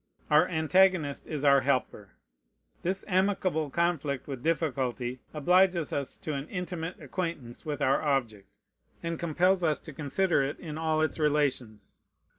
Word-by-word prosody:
Our 150 +1 +6
antagonist 160 -2 +2
is 150 -3 -4
our 140 -1 +6
helper. 125 -8 -1 0.7
This 185 +2 -1
amicable 185 -5 +1
conflict 155 -4 -1
with 135 -4 -6
difficulty 130 -6 -1
obliges 175 +1 +3
us 140 -2 -3
to 155 - -2
an 140 +1 -5
intimate 180 -1 -5
acquaintance 165 -7 -5
with 150 -1 -2
our 135 +1 +3
object, 120 -9 -1 0.5
and 165 -1 -3
compels 180 +3 +2
us 155 -3 +1
to 155 - -9
consider 155 +4 +1
it 140 +3 -3
in 155 -4 -7
all 155 0 +1
its 155 - -1
relations. 135 -8 -1
155 Hz, 140 wpm, -29 LUFS, 140-170 Hz, 0.7 s, Our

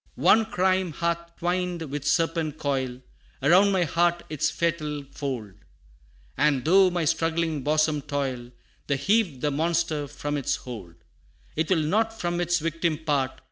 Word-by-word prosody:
IV. - - -7
"One 220 0 +6
crime 185 -3 +1
hath 170 0 -2
twined 175 -1 -1
with 145 0 -4
serpent 165 -1 +1
coil 130 -4 -2 0.4
Around 185 +7 +5
my 190 -2 +2
heart 170 +1 +1
its 155 - +1
fatal 155 -4 -2
fold; 125 -10 -4 0.8
And 140 -2 +2
though 190 +3 +6
my 175 -2 -1
struggling 165 -1 0
bosom 155 +1 +1
toil, 135 -4 -3 0.4
To 140 - +1
heave 170 - +1
the 150 - +1
monster 160 0 0
from 145 +1 -4
its 140 - 0
hold 100 -9 -9 0.6
It 160 +1 -1
will 170 -5 +3
not 225 +7 0
from 175 0 -1
its 175 0 +2
victim 165 0 -1
part. 145 -4 0
160 Hz, 150 wpm, -26 LUFS, 145-175 Hz, 0.8 s, One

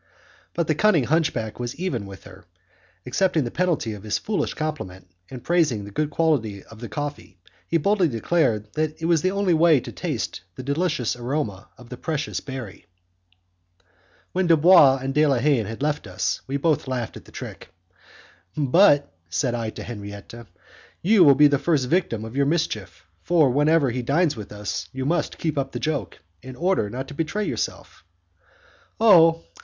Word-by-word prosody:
But 170 - 0
the 155 - +1
cunning 170 -3 +3
hunchback 125 -6 -1
was 120 0 -4
even 135 - -3
with 95 -1 -11
her; 95 -2 -14 0.6
accepting 160 +4 +1
the 120 - -4
penalty 170 -10 0
of 105 - -9
his 105 0 -1
foolish 210 -2 -2
compliment, 120 -13 -5 0.2
and 125 -2 -9
praising 150 - +1
the 100 - -10
good 150 +8 -1
quality 140 -11 0
of 115 - -15
the 120 -1 -7
coffee, 145 -4 -6 0.3
he 165 - +2
boldly 195 +2 +2
declared 115 -4 0
that 155 0 -2
it 165 - -4
was 165 -2 +3
the 185 - +1
only 195 -2 +1
way 160 -2 +5
to - - -8
taste - - -4
the 130 - -7
delicious 140 -4 -1
aroma 120 -5 -4
of 125 -1 -15
the 125 - -7
precious 155 +1 -3
berry. 130 -10 -8 1.4
When 185 0 0
Dubois 165 -4 +6
and 135 0 -2
De 150 +2 +3
la 135 -3 +2
Haye 135 0 +2
had 115 +6 -6
left 150 -6 -1
us, 95 0 -2
we 135 +1 -1
both 155 -1 0
laughed 125 -3 -3
at - - -11
the - - -16
trick. - - -9 0.9
"But," 145 +1 +4 0.2
said 85 +9 -1
I 115 -2 -2
to - - -8
Henriette, 100 -3 -8 0.7
"you 200 +1 +5
will 140 -4 +7
be 150 - +6
the 145 -1 +4
first 145 -6 +1
victim 125 - 0
of 110 +3 -9
your 140 0 +2
mischief, 110 - -2 0.2
for 160 -6 +3
whenever 145 0 +3
he 125 +1 -3
dines 145 +6 +1
with 105 -3 -9
us, 105 0 -5
you 130 0 -4
must 160 +2 -1
keep 155 -3 -2
up 135 0 -3
the - - -3
joke, 145 - -3 0.2
in 130 +4 -10
order 175 - 0
not 130 +4 -5
to - - -8
betray 165 +8 -2
yourself." - - -5 1.0
"Oh! 165 -6 +6
140 Hz, 180 wpm, -23 LUFS, 115-165 Hz, 1.4 s, will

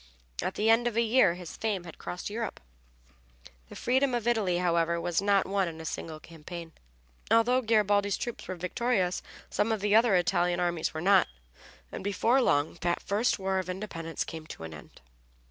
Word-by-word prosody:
At 185 - -3
the 215 - 0
end 230 +2 +4
of 235 -2 -2
a - - +5
year 220 -6 +4
his 180 -2 -9
fame 210 -5 -2
had 170 -2 -11
crossed 180 - -5
Europe. 225 -1 -4 1.1
The - - -10
freedom 260 +1 +1
of 235 -1 -2
Italy, 210 -7 +2
however, 170 -1 +1
was 175 +1 0
not 200 -1 +3
won 195 -1 0
in 160 -1 -7
a 160 - -8
single 160 0 -5
campaign. 165 +1 -9 0.6
Although 245 +3 +4
Garibaldi's 205 -3 +2
troops 240 - -5
were 185 - -4
victorious, 185 +1 0 0.3
some 225 - +1
of 220 - 0
the 205 +1 +1
other 225 -2 +5
Italian 175 0 +2
armies 175 -2 0
were 155 - -5
not, 195 +1 +5 0.6
and - - -6
before 225 +6 +2
long 150 - +1
that 175 0 0
first 210 +5 +1
war 190 0 0
of 185 -1 -5
independence 180 -4 -4
came 160 -1 -8
to 80 - -9
an 80 0 -7
end. 75 - -13
190 Hz, 185 wpm, -29 LUFS, 170-220 Hz, 1.1 s, a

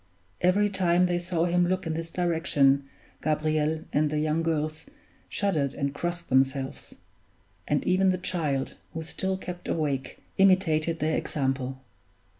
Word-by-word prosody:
Every 195 +4 +4
time 180 -2 +2
they 175 -1 +1
saw 175 -1 0
him 175 0 +2
look 185 +1 -1
in 165 - -1
this 165 +1 -4
direction 155 -6 +2 0.4
Gabriel 155 +1 0
and 150 0 +2
the 150 - -1
young 155 +1 +1
girls 155 - -2 0.4
shuddered 155 -10 0
and 140 0 -2
crossed 175 +3 -3
themselves; 135 0 0 0.7
and - - 0
even 185 +1 +3
the 185 - +2
child, 155 -7 -1 0.2
who 160 - -3
still 190 +4 -2
kept 180 -1 -7
awake, 140 -5 -2 0.2
imitated 170 -4 +3
their 155 0 0
example. 135 -2 -2
160 Hz, 140 wpm, -27 LUFS, 150-180 Hz, 0.7 s, Every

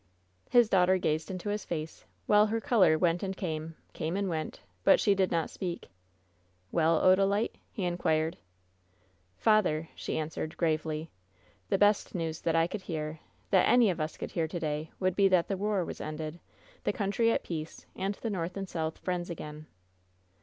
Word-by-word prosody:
His 240 -2 +6
daughter 185 -1 +4
gazed 155 -3 -1
into 190 +2 -4
his 210 0 -2
face, 160 -2 -5 0.2
while 210 +1 +5
her 225 +2 0
color 195 -9 +4
went 175 0 +2
and 190 -1 -3
came 160 -3 -4
— - - -37
came 160 +4 -2
and 200 -1 0
went; 160 -2 -3 0.2
but - - +6
she 205 - +4
did 190 -1 +2
not 165 -1 -1
speak. 175 - -5 0.8
"Well, 165 -1 +3
Odalile?" 195 +3 +3 0.2
he 200 - -4
inquired. 165 -2 +1 1.0
"Father," 170 - +2
she - - -5
then - - 0
answered, 155 +2 -5
gravely, 155 -1 -1 0.6
"the - - +3
best 205 0 +3
news 165 -2 -3
that 165 -1 +1
I 165 0 +4
could 195 +4 -5
hear, 155 -3 -4 0.3
that 190 - +5
any 240 -5 +5
of 170 - -4
us 155 +1 -3
could - - -5
hear 165 -2 0
to 175 +2 -4
day, 155 0 -2
would 185 -1 +1
be 200 0 +5
that 185 -3 +3
the 195 - -1
war 200 -2 0
was - - -7
ended, 155 +2 -5 0.4
the - - +1
country 230 0 +1
at - - 0
peace, 160 -2 -6
and 195 +2 -2
the 230 - -4
JSTorth 180 -2 -3
and 195 -1 -4
South 160 -2 -3
friends 180 -1 -3
again." 155 -2 -7
175 Hz, 185 wpm, -30 LUFS, 160-195 Hz, 1.0 s, His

